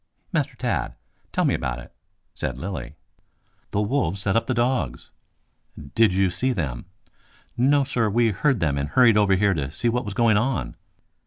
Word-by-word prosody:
Master - - 0
Tad, - - -2 0.4
tell - - +1
me - - +2
about 65 -1 -2
it," 65 - -12 0.4
said 65 -2 -4
Lilly. 65 -6 -6 0.7
"The 100 - 0
wolves 105 - 0
set 95 0 0
upon 115 - +1
the 130 - 0
dogs." 120 - -1 0.8
"Did 110 +1 +4
you 95 0 +2
see 130 +7 0
them?" 70 - -3 0.7
"No, 140 +3 +3
sir, 115 -4 0
we 115 +2 +2
heard 105 +4 +1
them 70 -3 +1
and 70 +1 -2
hurried 120 0 +5
over 100 -2 +4
here 100 +1 +2
to 70 -6 -3
see 120 - -1
what 125 +1 -1
was 105 -1 -5
going 115 -2 +4
on." 110 - -1
105 Hz, 175 wpm, -24 LUFS, 80-120 Hz, 0.8 s, hurried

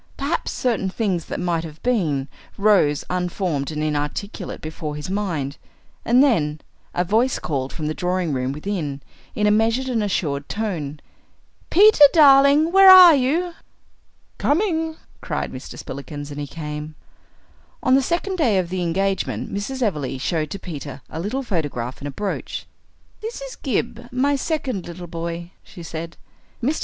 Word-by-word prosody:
Perhaps 285 +5 -2
certain 225 -6 0
things 190 -5 -1
that - - -5
might 170 -2 0
have 155 -1 -9
been 160 - 0 0.3
rose 195 -8 +3
unformed 180 -5 -2
and 155 -1 -3
inarticulate 155 +7 -3
before 155 -1 -5
his 150 +5 -5
mind. 170 -9 -2 0.5
And 245 +3 +5
then, 155 - +2 0.4
a 180 - +2
voice 225 +8 +2
called 135 -4 -3
from 155 - -5
the 155 - -1
drawing 180 -2 -1
room 130 0 -1
within, 150 -3 -4 0.3
in 210 - +1
a 210 - +4
measured 225 +5 +2
and 240 -4 0
assured 145 -8 -2
tone, 160 -9 -3 0.7
"Peter, 410 -4 +7
darling, 285 +1 +6
where 385 +1 +8
are 365 -3 +11
you?" 310 +6 +1 0.9
"Coming," 320 -1 +1 0.3
cried - - -3
Mr. 130 - -9
Spillikins, 145 +1 -7
and 145 - -6
he 145 - -4
came. 150 0 -6 0.9
On 255 - +3
the 270 - +6
second 350 +6 -1
day 240 - +3
of 180 -2 0
the 185 0 -2
engagement 190 +3 -1
Mrs. 250 +6 -3
Everleigh 150 - -1
showed 155 +2 -1
to 200 - -5
Peter 145 -7 -8
a 160 - -5
little 230 +10 -2
photograph 145 - -3
in 145 - -4
a - - -4
brooch. 200 +8 -4 0.6
"This 450 +2 -5
is - - -7
Gib, 240 -1 -3
my 275 +3 +2
second 275 - -2
little 175 +1 -8
boy," 170 0 -5
she 175 - -12
said. 165 0 -7 0.5
Mr. 290 +6 +1
185 Hz, 155 wpm, -22 LUFS, 150-255 Hz, 0.9 s, are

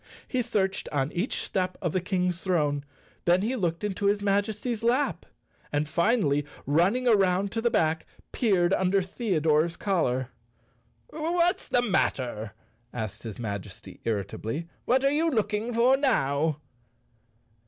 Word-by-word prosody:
He 255 - 0
searched 200 -5 -1
on 145 0 0
each 185 +8 -2
step 185 -2 -2
of 175 -5 -1
the 185 - +1
King's 180 -1 -1
throne, 150 -6 0 0.4
then 175 +2 +4
he 240 +5 0
looked 175 -5 -1
into 200 -1 -1
his 205 +1 +3
Majesty's 210 +3 0
lap 245 +5 +1 0.4
and, 145 +1 0
finally, 170 - +2 0.2
running 190 - +2
around 195 -3 +3
to 225 - -2
the 235 - +2
back 160 -5 +1 0.2
peered 190 -7 +2
un¬ 190 -1 +2
der 195 0 +2
Theodore's 170 -6 +1
collar. 130 - 0 0.8
"What's 340 +4 +1
the 245 - +2
matter?" 120 - -1 0.4
asked 110 -5 -5
his 110 -4 -7
Majesty 100 -5 -6
irritably. 110 - -3 0.2
"What 260 +2 +3
are 275 - +4
you 320 +3 +2
looking 215 -2 -1
for 240 +3 +4
now?" 155 - +1
190 Hz, 140 wpm, -27 LUFS, 150-230 Hz, 0.8 s, then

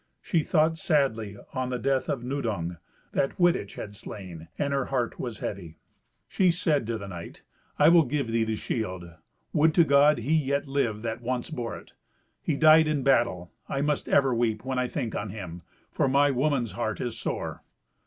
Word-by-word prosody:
She 170 - 0
thought 160 0 +2
sadly 115 - 0 0.2
on 130 -1 -2
the 125 - -1
death 130 +1 0
of 130 -4 -2
Nudung, 105 -11 -2 0.3
that 135 - 0
Wittich 175 - +2
had 105 - -7
slain; 95 -5 -9
and 140 -1 -1
her 135 -2 0
heart 125 -3 -2
was 120 -4 -4
heavy. 85 -6 -6 0.5
She 185 -2 +2
said 155 -7 +1
to 115 -1 -1
the 100 -2 -8
knight, 85 -3 -9 0.3
"I 150 +1 +6
will 170 -2 +6
give 135 -1 -2
thee 115 0 +2
the 110 0 -1
shield. 95 -6 -3 0.5
Would 155 +1 +3
to 170 - +7
God 145 0 +5
he 125 +7 -1
yet 140 -2 +1
lived 120 -6 -1
that 115 +1 -3
once 125 +3 -3
bore 120 -6 -4
it! - - -15 0.5
He 150 - -1
died 155 0 +7
in 150 -3 0
battle. 115 -10 +2 0.2
I 135 - -1
must 150 0 -1
ever 135 -2 +4
weep 115 -1 0
when 130 -1 -1
I 125 - 0
think 120 -2 -3
on 105 +1 -3
him, 90 -4 -7 0.3
for - - +1
my 140 +2 +4
woman's 135 -4 0
heart 110 +3 -3
is 120 -2 -3
sore." 115 - -4
125 Hz, 190 wpm, -27 LUFS, 110-145 Hz, 0.5 s, to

